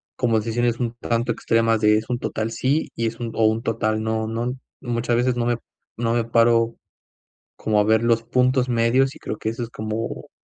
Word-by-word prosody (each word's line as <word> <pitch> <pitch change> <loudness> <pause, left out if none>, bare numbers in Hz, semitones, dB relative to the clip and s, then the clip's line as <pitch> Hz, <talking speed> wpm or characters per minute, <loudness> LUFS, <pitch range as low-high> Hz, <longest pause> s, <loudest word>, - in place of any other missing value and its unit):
como 115 -3 +2
decisiones 115 +2 0
un 120 -2 -1
tanto 120 0 -1
extremas 115 0 +2
de 105 0 +5
es 110 +2 -4
un 125 - 0
total 110 -2 -2
sí 140 +6 0
y 115 - -1
es 115 +1 -5
un 115 -1 -4
o 110 - +3
un 110 +1 +2
total 110 -2 -1
no, 110 0 -1
¿no? 115 +3 -2 0.3
Muchas 120 -1 -1
veces 125 +1 +2
no 120 -1 -1
me 120 -1 +1 0.4
no 115 -1 0
me 120 -1 +1
paro 115 0 +3 0.8
como 105 -1 +1
a 105 - +4
ver 110 +1 +3
los 115 -1 +2
puntos 125 +2 +2
medios, 120 +3 +2
y - - -14
creo 105 - -5
que 110 - -2
eso 120 +2 -4
es 115 - -6
como 110 +1 -5
115 Hz, 215 wpm, -23 LUFS, 110-120 Hz, 0.8 s, de